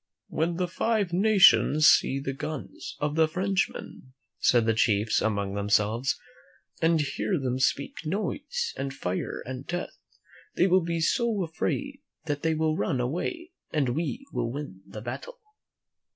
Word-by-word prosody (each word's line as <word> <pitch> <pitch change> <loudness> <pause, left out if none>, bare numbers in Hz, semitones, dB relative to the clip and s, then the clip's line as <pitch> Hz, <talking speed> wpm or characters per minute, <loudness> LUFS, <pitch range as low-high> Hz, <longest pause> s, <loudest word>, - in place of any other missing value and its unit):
"When 165 +2 0
the 180 +1 -1
Five 205 0 0
Nations 185 -6 +5
seethe 135 0 +4
guns 155 -3 -6
of 145 0 -1
the 160 0 +4
Frenchmen," 185 -6 -2 0.3
said 120 -2 +4
the 115 - +3
chiefs 105 -1 +2
among 100 -3 -1
themselves, 105 +5 +1 0.6
"and 165 0 +3
hear 155 +5 -1
them 130 -1 -1
speak 140 +3 0
noise 215 - -2
and 135 -1 -4
fire 90 -4 -3
and 130 +1 -7
death, 175 0 -4 0.6
they - - +4
will 185 0 +4
be 170 0 -2
so 220 +3 +1
afraid 275 - -3 0.2
that 145 -2 -2
they 160 -1 +1
will 155 0 +1
run 135 -4 0
away 180 - -3 0.2
and 145 -5 0
we 170 - -2
will 115 - -1
win 135 -9 -7
the 105 - -8
battle." - - -7
155 Hz, 145 wpm, -27 LUFS, 125-185 Hz, 0.6 s, Nations